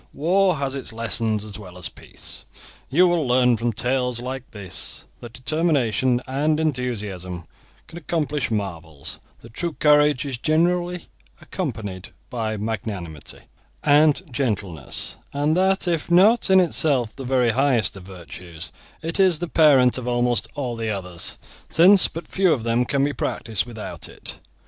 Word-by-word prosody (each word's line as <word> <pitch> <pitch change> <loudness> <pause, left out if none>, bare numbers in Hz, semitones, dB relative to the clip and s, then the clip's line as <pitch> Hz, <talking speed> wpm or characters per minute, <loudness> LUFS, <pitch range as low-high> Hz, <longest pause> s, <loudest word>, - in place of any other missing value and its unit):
War 185 +4 +3
has 140 -2 -2
its 135 -3 -5
lessons 110 -1 0
as 105 0 -8
well 90 -3 -11
as 90 - -2
Peace. - - -9 0.4
You 180 +7 +5
will 170 -5 +1
learn 125 -1 +4
from 115 +1 -1
tales 125 +2 -1
like 130 +1 -6
this 100 -4 -5
that 120 - -9
determination 130 -4 +1
and 150 +4 0
enthusiasm 105 - -3 0.4
can 170 +1 -10
accomplish 150 -6 -1
marvels, 85 -9 -4 0.2
that 115 -1 -14
true 170 +3 -2
courage 150 -3 +4
is 130 -4 -4
generally 175 +4 +1 0.3
accompanied 105 - -5 0.2
by 110 -3 -2
magnanimity 100 -7 -5 0.4
and 150 +3 +4
gentleness, 100 - -2 0.2
and 145 +2 +1
that 190 +1 +2
if 165 -2 -1
not 200 +7 +5
in 190 0 +7
itself 145 -9 +2
the 135 - -7
very 125 -2 +2
highest 125 -6 +2
of 95 - -9
virtues, 90 -2 -10 0.3
it 165 +4 -3
is 185 -4 +5
the 175 +2 -3
parent 135 -7 +5
of 125 - -7
almost 120 -2 +1
all 125 -4 -3
the 115 -1 -3
others, 90 -4 -2 0.3
since 185 +4 +6
but 165 - -8
few 190 -2 +2
of 120 - -3
them 115 +1 +1
can 140 +2 +1
be 145 0 0
practised 115 -3 -2
without 110 -3 -7
it. - - -6
125 Hz, 150 wpm, -23 LUFS, 110-155 Hz, 0.4 s, in